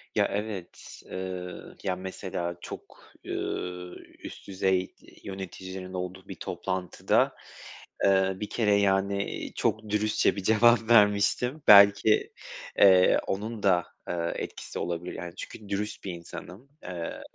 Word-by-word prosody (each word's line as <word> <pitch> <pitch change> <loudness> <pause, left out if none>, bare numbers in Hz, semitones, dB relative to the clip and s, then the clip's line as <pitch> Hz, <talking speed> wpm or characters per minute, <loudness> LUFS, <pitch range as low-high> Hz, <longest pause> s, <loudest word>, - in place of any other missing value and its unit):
Ya - - +4
evet, 100 -3 -6
eee, 90 -1 -5 0.3
ya 95 -2 0
mesela 90 -2 -4
çok, - - -11
ııı, 90 0 -4 0.2
üst - - -10
düzey 95 -1 0 0.3
yöneticinin 95 -1 -7
olduğu 90 +1 -5
bir 95 - -7
toplantıda, 90 0 -1 0.7
eee, 95 -1 +4
bir 105 - -4
kere, 105 -3 +2
yani, 100 0 +2
iii, - - -6
çok 110 0 -1
dürüstçe 105 +1 +2
bir 100 - -5
cevap 115 +2 +4
vermiştim. 105 +6 +4
Belki, 100 +1 +7 0.4
eee, 95 -2 +6
onun 105 +2 -3
da, 90 -3 +3 0.2
eee, 85 -1 -2
etkisi - - -6
olabilir, 85 +1 -3
yani, 85 -1 -7
çünkü 105 +1 -9
dürüst 105 +1 -3
bir 95 - -4
insanım, 90 +7 -10
eee, 85 -2 -5
95 Hz, 125 wpm, -28 LUFS, 90-105 Hz, 0.7 s, Belki